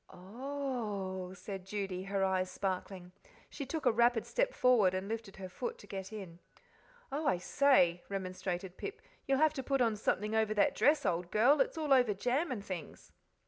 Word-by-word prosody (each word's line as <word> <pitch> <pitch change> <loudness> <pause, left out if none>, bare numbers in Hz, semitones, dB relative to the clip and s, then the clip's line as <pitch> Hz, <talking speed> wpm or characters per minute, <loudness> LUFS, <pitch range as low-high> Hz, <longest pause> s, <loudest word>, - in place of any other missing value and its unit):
"Oh 210 -4 -4
h - - -9
h!" - - -13
said 195 -2 -7
Judy, 195 -2 -3
her 195 0 0
eyes 185 -1 0
sparkling. 185 -1 -4 0.4
She 280 - -6
took 315 +1 -4
a - - +6
rapid 235 0 +3
step - - 0
forward 220 -8 +4
and 190 +1 -3
lifted 220 -2 -5
her 190 -1 -7
foot 470 - -5
to - - -14
get 190 0 -6
in. 190 -6 -8 0.7
"Oh, 295 +2 -2
I 185 - +3
say!" 180 -5 +3
remonstrated 185 -1 -4
Pip, 435 +2 -7 0.2
"you'll 270 0 +3
have 310 +1 +4
to 275 - -3
put 275 +1 0
on 230 -3 +2
something 210 0 -1
over 220 -1 +1
that 205 - +3
dress, 300 +2 +3
old 175 -1 0
girl 245 +10 +4
it's - - 0
all 305 -3 +2
over 245 -6 +4
jam 260 - 0
and 205 -5 -4
things." 180 -4 -7
210 Hz, 190 wpm, -33 LUFS, 185-265 Hz, 0.7 s, a